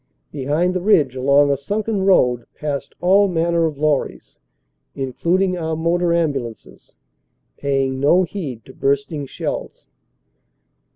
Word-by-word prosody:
Behind 150 +6 0
the 185 - -2
ridge, 155 - +3
along 140 +2 +3
a 140 - +1
sunken 205 +8 -2
road, 125 -11 +3
passed 145 -2 -4
all 195 +3 +4
manner 170 -1 +1
of 150 -3 -6
lorries, 150 -1 -2 0.6
including 175 +8 0
our 160 -1 -2
motor 170 +2 +1
ambulances, 140 -9 -3 0.6
paying 135 -1 -1
no 170 +7 +4
heed 155 - -6
to 130 - -13
bursting 140 +2 -1
shells. - - -5
155 Hz, 120 wpm, -20 LUFS, 135-175 Hz, 0.6 s, all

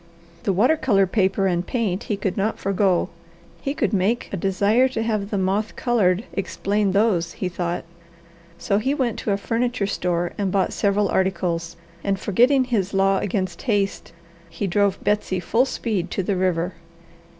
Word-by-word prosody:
The 200 - +2
water 245 - +3
colour 200 -9 +3
paper 190 0 +1
and 175 -2 +1
paint 215 -2 -2
he 210 - -2
could 190 -2 -2
not 210 +3 -1
forego. 195 -2 +1 0.5
He 275 +1 -2
could 220 -8 0
make 205 +5 +1
a - - +1
desire 200 +7 +2
to 230 -4 -3
have 215 -3 -1
the 205 - -1
moth 195 +3 0
coloured 210 -5 +2
explain 200 +1 -1
those, 195 -5 +2
he 185 - -3
thought. 175 -1 -3 0.8
Then 200 - +3
he 270 +6 0
went 250 -6 -1
to 210 - -2
a 200 - +2
furniture 235 +1 -1
store 175 -3 -1
and 195 -2 0
bought 195 -1 +1
several 200 0 +1
articles, 175 -3 -1 0.3
and 195 -1 0
forgetting 250 +8 +3
his 205 -6 -1
law 195 0 +3
against 185 -3 -2
haste, 205 -5 -1 0.4
he 200 - -4
drove 200 +1 +1
Betsy 205 -3 0
full 230 +8 +2
speed 210 -9 -2
to 195 - -2
the 195 +2 0
river. 180 -1 0
200 Hz, 170 wpm, -23 LUFS, 185-220 Hz, 0.8 s, water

